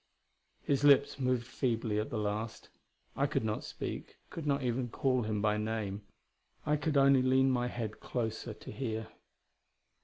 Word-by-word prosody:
His 140 Hz, -1 st, +1 dB
lips 140 Hz, -1 st, +5 dB
moved 125 Hz, -2 st, +1 dB
feebly 115 Hz, -4 st, -1 dB
at 105 Hz, -, -2 dB
the 115 Hz, -, -3 dB
last. 105 Hz, +1 st, -3 dB, 0.5 s
I -, -, +2 dB
could -, -, 0 dB
not 110 Hz, -1 st, -1 dB
speak; -, -, -6 dB
could 160 Hz, -3 st, -5 dB
not 140 Hz, -1 st, +1 dB
even 120 Hz, 0 st, 0 dB
call 130 Hz, +1 st, +1 dB
him 110 Hz, -2 st, -1 dB
by 105 Hz, 0 st, +3 dB
name; 105 Hz, -2 st, -2 dB, 0.6 s
I 150 Hz, 0 st, +3 dB
could 150 Hz, 0 st, 0 dB
only 135 Hz, -1 st, +6 dB
lean 130 Hz, +1 st, +4 dB
my 125 Hz, -1 st, +1 dB
head 115 Hz, -3 st, -4 dB
closer 110 Hz, -2 st, -3 dB
to -, -, -10 dB
hear. 110 Hz, -4 st, -3 dB
120 Hz, 160 wpm, -32 LUFS, 110-135 Hz, 0.6 s, only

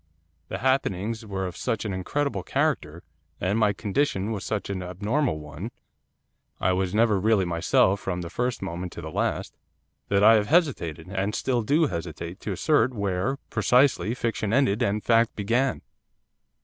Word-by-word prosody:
The -, -, -4 dB
happenings 115 Hz, -3 st, 0 dB
were 95 Hz, -1 st, -3 dB
of 90 Hz, -, -5 dB
such 115 Hz, -3 st, -2 dB
an 105 Hz, -, -2 dB
incredible 140 Hz, +10 st, -1 dB
character, 130 Hz, -, -1 dB, 0.4 s
and 100 Hz, +5 st, 0 dB
my 105 Hz, -2 st, +4 dB
condition 105 Hz, 0 st, -1 dB
was 105 Hz, -4 st, -3 dB
such 105 Hz, -2 st, -2 dB
an 95 Hz, -2 st, -3 dB
abnormal 100 Hz, -, -1 dB
one, 75 Hz, +8 st, -7 dB, 0.9 s
I 95 Hz, -, +2 dB
was 95 Hz, +1 st, -1 dB
never 110 Hz, -3 st, +3 dB
really 105 Hz, -1 st, +3 dB
myself 90 Hz, +3 st, +2 dB
from 90 Hz, -3 st, -3 dB
the 85 Hz, -, -6 dB
first 125 Hz, -3 st, -2 dB
moment 90 Hz, -1 st, -5 dB
to -, -, -7 dB
the 80 Hz, -, -7 dB
last -, -, -1 dB, 0.5 s
that 100 Hz, 0 st, +2 dB
I 110 Hz, +2 st, +8 dB
have 105 Hz, -2 st, +3 dB
hesitated, 125 Hz, -, +1 dB
and 100 Hz, +2 st, -1 dB
still 125 Hz, -3 st, 0 dB
do 150 Hz, +9 st, +3 dB
hesitate, 85 Hz, -, -5 dB
to 105 Hz, -, -4 dB
assert 130 Hz, -, +2 dB
where, 100 Hz, +5 st, -1 dB
precisely, 125 Hz, +1 st, +3 dB
fiction 115 Hz, -4 st, -2 dB
ended 125 Hz, -3 st, +2 dB
and 105 Hz, -2 st, 0 dB
fact 115 Hz, 0 st, +3 dB
began. 120 Hz, +6 st, 0 dB
105 Hz, 160 wpm, -26 LUFS, 95-120 Hz, 0.9 s, I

